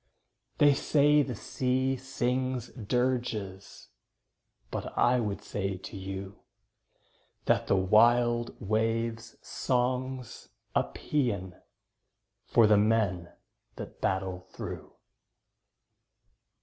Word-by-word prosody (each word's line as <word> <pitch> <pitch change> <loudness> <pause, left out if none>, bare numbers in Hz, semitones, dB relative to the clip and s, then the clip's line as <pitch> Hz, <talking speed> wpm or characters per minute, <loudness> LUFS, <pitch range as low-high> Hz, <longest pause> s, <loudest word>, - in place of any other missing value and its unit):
They 145 -1 +6
say 150 +1 +4
the 130 -4 -3
sea 130 +3 0
sings 130 -1 -2
dirges, 115 -5 -3 0.8
But - - -5
I 125 +1 +4
would 105 -4 -3
say 100 -2 -3
to 95 +1 -10
you 95 0 -6 1.1
That - - +2
the - - +3
wild 120 +5 +3
wave's 115 +1 -1
song's 125 0 -2 0.2
a - - +2
paean 100 -11 -2 0.9
For 115 - +5
the 105 -1 +5
men 100 -5 +1 0.4
that - - -9
battle 95 -1 -2
through. - - -7
115 Hz, 90 wpm, -29 LUFS, 100-125 Hz, 1.1 s, They